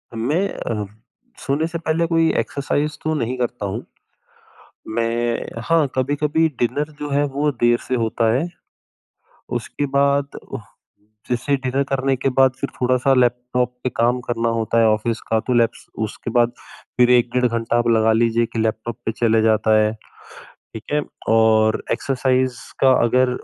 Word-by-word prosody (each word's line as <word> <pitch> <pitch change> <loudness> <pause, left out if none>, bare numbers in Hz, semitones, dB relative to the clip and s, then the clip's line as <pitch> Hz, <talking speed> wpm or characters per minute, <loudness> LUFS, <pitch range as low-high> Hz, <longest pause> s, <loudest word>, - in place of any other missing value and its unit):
मैं 150 - 0
अ, 105 -3 -4 0.5
सोने 145 +4 -1
से 170 0 -4
पहले 165 0 0
कोई 165 -1 +3
एक्सरसाइज़ 145 +2 -2
तो 155 - 0
नहीं 125 -1 -2
करता 120 -3 -2
हूँ। 95 - -4 1.1
मैं 115 0 -1
हाँ 165 -2 +4
कभी-कभी 145 +4 +1
डिनर 145 +5 -1
जो 145 0 -4
है 145 +1 +2
वो 150 +1 +2
देर 120 0 +4
से 130 - 0
होता 115 -1 +1
है 140 +9 0 1.1
उसके 145 - -4
बाद 140 0 +1 0.9
जैसे 125 +4 +1
डिनर 130 +2 +1
करने 135 0 +1
के 135 +2 -1
बाद 130 -1 +6
फिर - - -2
थोड़ा-सा 130 +2 +2
लैपटॉप 125 0 +1
पे 125 - 0
काम 120 +2 +2
करना 115 -1 0
होता 115 +1 0
है, 115 - +5
ऑफ़िस 110 +1 0
का 110 0 +3
तो 125 - -3
लैप्स 115 -1 +1 0.2
उसके 115 - -7
बाद 120 0 +2 0.5
फिर 125 0 +5
1 120 -1 +4
डेढ़ 125 0 +3
घंटा 115 0 0
आप 120 0 +1
लगा 110 -1 +4
लीजिए 115 +1 +2
कि 115 - -7
लैपटॉप 110 +1 -2
पे 110 - 0
चले 115 -1 +2
जाता 110 0 +3
है। 105 0 +2 0.8
ठीक 110 - -7
है 150 - +2 0.3
और 110 -1 +3
एक्सरसाइज़ 130 -1 0 0.2
का 135 - +5
अगर 125 +2 +3
125 Hz, 160 wpm, -21 LUFS, 115-140 Hz, 1.1 s, बाद